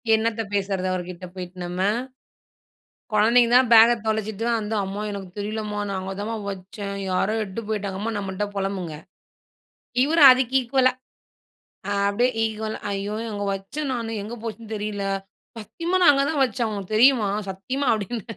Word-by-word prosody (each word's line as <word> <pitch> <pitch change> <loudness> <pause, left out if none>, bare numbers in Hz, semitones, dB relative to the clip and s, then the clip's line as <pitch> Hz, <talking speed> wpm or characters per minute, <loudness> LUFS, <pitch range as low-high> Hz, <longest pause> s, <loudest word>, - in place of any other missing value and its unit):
என்னத்த 225 0 0
பேசுறது 195 -2 -1
அவருகிட்ட 180 0 -5
போயிட்டு 180 0 -8
நம்ம. 180 +1 -4 1.3
குழந்தைங்க 230 +3 +4
தான் 255 -1 +5
பேக்க 230 +1 +9
தொலைச்சுட்டு 220 0 -1
தான் 230 -1 +2
வந்து, 215 +1 -3
"அம்மா 200 +2 -4
எனக்கு 195 -2 -6
தெரியல 215 +2 -3
மா, 205 - -2
நா 195 - -2
அங்க 190 +1 -5
தாம்மா 225 +2 -3
வச்சேன். 200 +1 -6
யாரோ 200 +4 +1
எட்டு 195 +3 -6
போய்ட்டாங்க 200 -3 -3
அம்மா," 225 +2 -2
நம்மள்ட்ட 195 0 -3
புலம்புங்க. 190 -5 -3 1.1
இவர் 325 +3 +2
அதுக்கு 255 0 +1
இக்வால்லா. 255 +1 +3 1.0
அ - - -1 0.2
அப்படியே 240 +5 +2
ஈக்வல 220 0 -3 0.2
"ஐயோ, 200 +2 -3 0.2
அங்க 205 0 -3
வச்சேன் 265 +10 -4
நானு 230 -2 -3
எங்க 220 +3 -6
போச்சுன்னு 225 -1 -7
தெரியல. 205 -1 -3 0.5
சத்தியமா 335 - -3
நான் 290 - +8
அங்க 275 0 +2
தான் 290 -4 +1
வச்சேன் 235 -2 -1
உனக்கு 200 +1 -4
தெரியுமா 235 -3 +5 0.2
சத்தியமா," 255 +9 -3
அப்படின். 215 +1 -4
215 Hz, 155 wpm, -24 LUFS, 195-235 Hz, 1.3 s, பேக்க